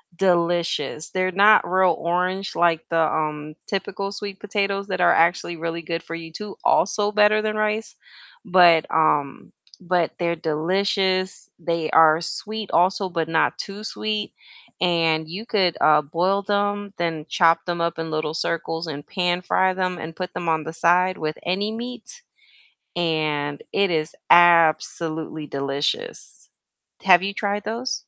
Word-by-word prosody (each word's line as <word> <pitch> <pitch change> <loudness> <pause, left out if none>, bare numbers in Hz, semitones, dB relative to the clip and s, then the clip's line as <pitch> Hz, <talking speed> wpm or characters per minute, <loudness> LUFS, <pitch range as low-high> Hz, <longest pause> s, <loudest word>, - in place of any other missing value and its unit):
delicious. 170 -4 0
They're 185 0 -1
not 205 +3 +5
real 185 -2 +3
orange 180 +3 -2
like 170 -2 +2
the, 165 - +2
um, 155 -1 -2
typical 195 0 -3
sweet 200 -1 -7
potatoes 200 -1 -2
that 180 -2 -2
are - - +5
actually 170 +1 +2
really 165 +1 -4
good 165 +1 -4
for 165 - -8
you 165 -1 -9
too, 210 +3 -8
also 205 +2 +2
better 210 0 +4
than 215 0 -2
rice, 215 +1 -1 0.5
but, 175 -4 +5
um, 150 -3 0 0.3
but 175 -2 0
they're 170 -1 0
delicious, 185 +4 -1
they 165 -1 -2
are 160 0 +5
sweet 215 +4 -5
also, 185 +2 +2
but 165 -2 -2
not 160 -1 +1
too 205 +1 -7
sweet, 215 -1 -3 0.5
and 165 -3 +1
you 195 +8 -7
could, 185 -6 +1
uh, 150 0 +5
boil 180 +7 0
them, 205 0 -1
then 165 -3 -2
chop 165 -1 +3
them 170 -1 -3
up 170 -1 -1
in 165 0 -4
little 155 0 -2
circles 165 0 -2
and 145 -2 -7
pan-fry 180 0 0
them 185 -1 -2
and 160 0 -8
put 180 -1 -6
them 170 - -4
on 160 -1 0
the 160 - -6
side 180 +3 +2
with 155 -1 -4
any 200 +4 -1
meat, 245 - -8 0.8
and 155 -4 -1
it 200 -2 +2
is 155 -1 -1 0.2
absolutely 160 -2 +3
delicious. 140 - -4 0.5
Have 185 -2 +6
you 200 +1 -2
tried 205 -1 -2
those? 230 +4 -3
175 Hz, 150 wpm, -22 LUFS, 160-195 Hz, 0.8 s, Have